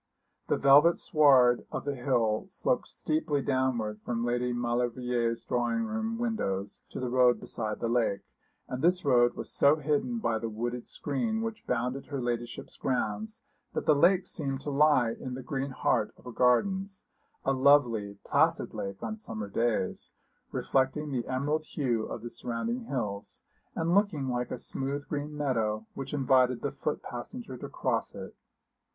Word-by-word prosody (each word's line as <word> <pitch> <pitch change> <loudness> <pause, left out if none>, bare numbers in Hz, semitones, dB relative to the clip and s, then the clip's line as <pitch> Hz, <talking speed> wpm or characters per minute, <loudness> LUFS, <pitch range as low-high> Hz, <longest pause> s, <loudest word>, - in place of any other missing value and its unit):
The - - +2
velvet 145 +5 +6
sward 130 -5 +4
of - - -4
the 145 - -1
hill 120 -5 +1
sloped - - 0
steeply 150 -2 -1
downward 120 -6 0
from 120 -1 -2
Lady 120 +1 0
Maulevrier's 120 -1 -1
drawing 125 - 0
room 220 0 -2
windows 100 - -2
to - - -6
the 130 - -2
road 125 -1 +4
beside 105 -1 -4
the 115 - -1
lake, 115 -4 +1 0.5
and 125 - -4
this 180 +1 +3
road 120 -3 +4
was - - -5
so 140 +2 +5
hidden 155 - 0
by 115 - 0
the 115 - -3
wooded 120 +2 -4
screen 220 - -2
which 225 -1 -5
bounded 125 +2 -1
her 140 -2 -4
ladyship's 120 -1 -4
grounds 215 - -2 0.3
that - - -2
the 155 - +6
lake 175 +5 +4
seemed 135 -3 -3
to 145 - -4
lie 140 -5 +4
in 125 +2 -6
the 130 - -7
green 135 0 -3
heart 130 - +1
of - - -19
her 125 - -6
gardens, 190 - +1 0.4
a 135 - +3
lovely, 125 -7 +3
placid - - +2
lake 100 0 -5
on 215 - -3
summer 110 - -6
days, 115 -2 -1 0.4
reflecting 140 +3 0
the 125 -3 -2
emerald 145 +4 0
hue 125 -8 -1
of 115 - -6
the 120 - -5
surrounding 230 - -3
hills, 105 - -4 0.3
and 165 +1 0
looking 185 -10 +2
like 125 0 -1
a - - -4
smooth 140 +2 -4
green 150 0 -4
meadow, 110 -7 0
which 135 -1 -6
invited 130 -3 +3
the - - -1
foot - - -3
passenger - - -7
to - - -7
cross - - -2
it. - - -8
130 Hz, 165 wpm, -29 LUFS, 120-150 Hz, 0.5 s, velvet